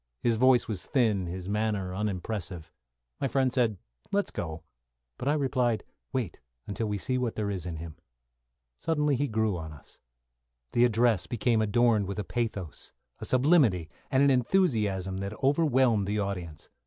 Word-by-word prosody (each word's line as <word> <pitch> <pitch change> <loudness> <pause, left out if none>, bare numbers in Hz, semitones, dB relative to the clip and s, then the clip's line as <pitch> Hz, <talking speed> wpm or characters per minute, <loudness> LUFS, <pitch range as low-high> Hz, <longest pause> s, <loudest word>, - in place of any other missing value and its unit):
His 115 -2 +2
voice 130 +1 +4
was 100 -5 -4
thin, 110 -8 +2
his 90 +1 -5
manner 105 -3 -1
unimpressive. 95 -4 -3 0.5
My - - 0
friend 130 -1 +1
said, 115 -6 +2 0.3
"Let's 200 0 0
go," 80 -1 -5 0.6
but - - -3
I 145 - +4
replied, 130 -6 +1 0.3
"Wait 120 -10 -3 0.3
until 110 +2 -2
we 105 -1 -1
see 130 +6 -1
what 120 -3 -1
there 105 -2 -1
is 90 -3 -4
in 85 - -4
him." 80 -1 -8 0.8
Suddenly, 150 -3 +1
he 145 +3 0
grew 110 -4 0
upon 80 -2 -7
us. 70 - -17 0.7
The 120 - +4
address 115 -4 +2
became 115 -1 +1
adorned 110 -1 +3
with 100 - -4
a 105 - -1
pathos, 100 - -4 0.3
a - - -5
sublimity, 125 - +3 0.2
and 130 +1 +3
an 140 - +5
enthusiasm 110 - +1
that 100 +2 -5
overwhelmed 130 -8 +3
the 105 +1 0
audience. 90 -6 -4
110 Hz, 160 wpm, -28 LUFS, 95-125 Hz, 0.8 s, an